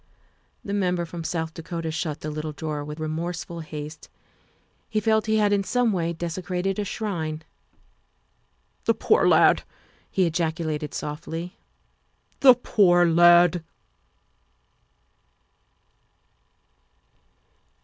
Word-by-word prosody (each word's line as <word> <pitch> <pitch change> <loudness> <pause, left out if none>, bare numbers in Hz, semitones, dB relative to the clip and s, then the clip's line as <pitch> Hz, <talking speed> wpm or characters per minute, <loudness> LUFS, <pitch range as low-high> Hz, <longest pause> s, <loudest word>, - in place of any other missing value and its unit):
The 200 - -4
Member 180 -3 0
from 170 0 -7
South 160 -1 -3
Dakota 165 -1 -5
shut 155 -2 -3
the 155 - -4
little 155 0 -5
drawer 150 -1 -4
with 150 +1 -7
remorseful 165 +2 -4
haste; 155 -1 -8 0.8
he 215 - 0
felt 220 0 +1
he 220 0 +2
had 205 -1 +3
in 200 -1 +2
some 245 +2 +1
way 170 -2 -1
desecrated 180 +3 -3
a - - 0
shrine. 165 -7 -4 1.4
'The - - +3
poor - - +3
lad!" - - +5 0.5
he 190 - +1
ejaculated, 160 -3 -2
softly, 165 +4 -6 0.8
"the 255 -2 +8
poor 180 -7 +4
lad!" 175 0 +5
170 Hz, 105 wpm, -25 LUFS, 160-190 Hz, 1.4 s, the